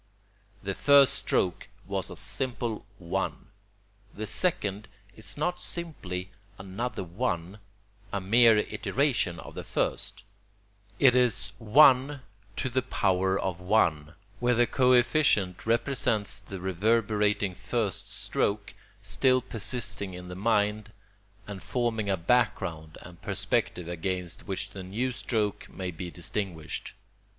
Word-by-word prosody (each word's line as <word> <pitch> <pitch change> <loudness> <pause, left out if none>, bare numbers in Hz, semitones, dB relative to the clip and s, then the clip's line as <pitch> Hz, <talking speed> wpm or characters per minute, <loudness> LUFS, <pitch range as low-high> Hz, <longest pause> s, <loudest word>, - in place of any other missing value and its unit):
The 100 0 -2
first 140 +4 +6
stroke 90 -9 -1 0.2
was - - -3
a - - -8
simple 120 -4 -3
1. 95 +2 -3 0.7
The 110 - -4
second 105 - 0 0.3
is 110 - -3
not 175 +4 -1
simply 95 - -4 0.3
another 95 +4 -4
1, 90 0 -3 0.5
a 100 - -1
mere 115 +4 +5
iteration 105 - 0
of - - -10
the - - -6
first. 105 +1 -2 0.7
It 130 -2 +6
is 125 -5 +2
1^, 130 +4 +5 2.2
where 125 0 +3
the 120 +1 +4
coefficient 125 - +3
represents 115 -4 0
the 100 -2 -8
reverberating 105 +1 +1
first 105 +1 -2
stroke, 100 0 -1 0.3
still 130 -1 +3
persisting 110 -5 -3
in 90 0 -9
the 90 - -6
mind, 105 0 +1 0.5
and 100 -3 -7
forming 110 0 -1
a 95 - +2
background 85 -6 0
and 90 -1 -13
perspective 90 -2 -1
against 90 0 -4
which 100 0 -3
the 100 - -7
new 110 +8 -2
stroke 110 -4 -2
may 95 -1 -5
be 90 +1 -6
distinguished. 85 -2 -4
105 Hz, 110 wpm, -28 LUFS, 95-125 Hz, 2.2 s, first